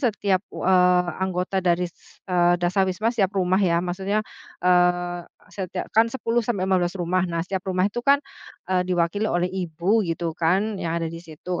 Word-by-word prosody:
setiap 205 Hz, -7 st, +1 dB
u -, -, -6 dB
eee, 180 Hz, -1 st, +4 dB, 0.2 s
anggota 190 Hz, +1 st, -1 dB
dari 180 Hz, -1 st, +1 dB
ses 170 Hz, -, -19 dB
eee, 175 Hz, -1 st, +3 dB
Dasawisma 190 Hz, +5 st, +1 dB
setiap 200 Hz, -4 st, 0 dB
rumah 185 Hz, +1 st, +2 dB
ya. 170 Hz, -3 st, +3 dB
Maksudnya, 195 Hz, +4 st, -1 dB, 0.4 s
eee, 175 Hz, -1 st, +3 dB, 0.3 s
setiak 185 Hz, 0 st, -5 dB
kan 225 Hz, +1 st, +5 dB
10 240 Hz, -1 st, 0 dB
sampai 210 Hz, -5 st, -1 dB
15 185 Hz, -1 st, +1 dB
rumah. 180 Hz, +2 st, +1 dB
Nah, 170 Hz, -1 st, -2 dB
setiap 190 Hz, 0 st, -3 dB
rumah 185 Hz, 0 st, +1 dB
itu 210 Hz, +4 st, -3 dB
kan, 280 Hz, +3 st, +4 dB, 0.5 s
eee, 180 Hz, -1 st, +3 dB
diwakili 180 Hz, +4 st, 0 dB
oleh 175 Hz, +1 st, +1 dB
ibu 180 Hz, +3 st, 0 dB
gitu 170 Hz, -2 st, -2 dB
kan 190 Hz, +5 st, 0 dB
yang 165 Hz, 0 st, -2 dB
ada 165 Hz, -1 st, -1 dB
di 165 Hz, -, -7 dB
situ. 170 Hz, +2 st, -6 dB
180 Hz, 175 wpm, -24 LUFS, 175-195 Hz, 0.5 s, kan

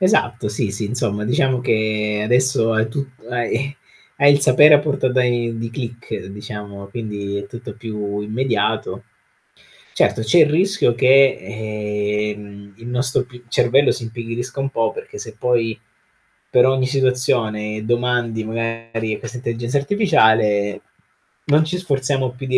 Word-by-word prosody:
Esatto, 120 Hz, -, +2 dB
sì, 105 Hz, 0 st, -1 dB
sì, 105 Hz, +2 st, -3 dB
insomma 105 Hz, -2 st, -2 dB
diciamo 125 Hz, +2 st, +1 dB
che 110 Hz, -3 st, 0 dB
adesso 125 Hz, 0 st, +2 dB
hai 110 Hz, 0 st, +2 dB
tut 140 Hz, +4 st, -4 dB, 0.2 s
hai 125 Hz, +3 st, -2 dB, 0.4 s
hai 140 Hz, +1 st, +6 dB
il 140 Hz, -, +3 dB
sapere 145 Hz, +3 st, +7 dB
a -, -, +8 dB
portata 130 Hz, -3 st, +1 dB
i 120 Hz, -1 st, 0 dB
di 115 Hz, 0 st, -4 dB
click 120 Hz, -1 st, -6 dB
diciamo, 100 Hz, 0 st, -8 dB
quindi 100 Hz, -2 st, -5 dB
è 100 Hz, -, -6 dB
tutto 120 Hz, +2 st, -9 dB
più 105 Hz, -3 st, -4 dB
immediato. 115 Hz, +4 st, -1 dB, 0.9 s
Certo -, -, +2 dB
c'è 110 Hz, +10 st, +4 dB
il 155 Hz, -2 st, +6 dB
rischio 185 Hz, -3 st, +2 dB
che, 135 Hz, +3 st, +5 dB
ehm, 105 Hz, -1 st, -4 dB
il 115 Hz, +1 st, -10 dB
nostro 125 Hz, +2 st, 0 dB
p 125 Hz, -1 st, -15 dB
cervello 130 Hz, +3 st, +3 dB
si 120 Hz, -, -4 dB
impigrisca 115 Hz, +3 st, -5 dB
un 135 Hz, 0 st, -1 dB
po', -, -, 0 dB
perché 455 Hz, -2 st, -9 dB
se -, -, -9 dB
poi 115 Hz, -3 st, 0 dB, 0.7 s
per 125 Hz, -1 st, +5 dB
ogni 130 Hz, 0 st, +2 dB
situazione 120 Hz, -5 st, 0 dB
domandi 120 Hz, -1 st, 0 dB
magari 115 Hz, 0 st, -3 dB
a -, -, -5 dB
questa 125 Hz, -, -7 dB
intelligenza 120 Hz, +2 st, -2 dB
artificiale, 110 Hz, -, +2 dB, 0.6 s
non 150 Hz, +2 st, +4 dB
ci 180 Hz, +3 st, -2 dB
sforziamo 135 Hz, -6 st, -1 dB
più 125 Hz, +2 st, -9 dB
di 130 Hz, 0 st, +3 dB
120 Hz, 145 wpm, -20 LUFS, 110-130 Hz, 0.9 s, a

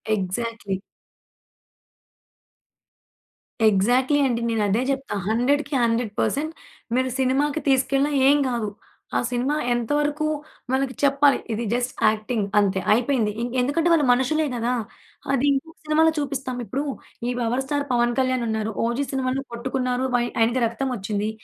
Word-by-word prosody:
Exactly. 200 Hz, +1 st, -3 dB, 2.9 s
Exactly 245 Hz, +8 st, +3 dB
అండి. 235 Hz, -2 st, -1 dB
నేనదే 215 Hz, 0 st, +1 dB
జెప్తా. 270 Hz, -3 st, -2 dB
హండ్రెడ్‌కి 275 Hz, +6 st, +1 dB
హండ్రెడ్ 230 Hz, -1 st, +1 dB
పర్సెంట్ 305 Hz, +3 st, 0 dB, 0.4 s
మీరు 260 Hz, 0 st, +1 dB
సినిమాకి 280 Hz, +4 st, +1 dB
తీసుకెళ్ళినా 275 Hz, +2 st, +2 dB, 0.2 s
ఏం 285 Hz, +1 st, +6 dB
గాదు. 235 Hz, -4 st, -1 dB, 0.5 s
ఆ -, -, +3 dB
సినిమా 250 Hz, +4 st, 0 dB, 0.2 s
ఎంతవరకు 290 Hz, +5 st, 0 dB, 0.5 s
మనకు 265 Hz, 0 st, 0 dB
చెప్పాలి, 280 Hz, 0 st, +4 dB, 0.2 s
ఇది 230 Hz, +2 st, -2 dB
జస్ట్ 245 Hz, +1 st, 0 dB, 0.2 s
యాక్టింగ్ 215 Hz, 0 st, 0 dB
అంతే. 195 Hz, -2 st, +2 dB
అయిపోయింది. 235 Hz, -2 st, +1 dB
ఇంకెందుకంటే, 260 Hz, +7 st, +1 dB
వాళ్ళు 305 Hz, -4 st, +3 dB
మనుషులే 300 Hz, +5 st, +1 dB
గదా! 240 Hz, +1 st, 0 dB, 0.6 s
అది 275 Hz, +1 st, +2 dB
ఇంకొక 320 Hz, +4 st, -2 dB
సినిమాలో 315 Hz, +1 st, +4 dB
చూపిస్తాం, 270 Hz, -3 st, -3 dB
ఇప్పుడూ 275 Hz, +5 st, -2 dB, 0.4 s
ఈ -, -, 0 dB
'పవర్ 245 Hz, +3 st, 0 dB
స్టార్ 285 Hz, +1 st, -1 dB
పవన్ 240 Hz, 0 st, +3 dB
కళ్యాణ్' 255 Hz, -1 st, +1 dB
ఉన్నారు. 220 Hz, 0 st, -1 dB
'ఓజీ' 240 Hz, +4 st, 0 dB
సినిమాలో 265 Hz, 0 st, -1 dB
కొట్టుకున్నారు 250 Hz, +1 st, -1 dB
బయ్ 240 Hz, 0 st, +2 dB
ఆయనకి 235 Hz, +3 st, +2 dB
రక్తమొచ్చిందీ. 220 Hz, -4 st, -2 dB
255 Hz, 125 wpm, -23 LUFS, 230-275 Hz, 2.9 s, ఏం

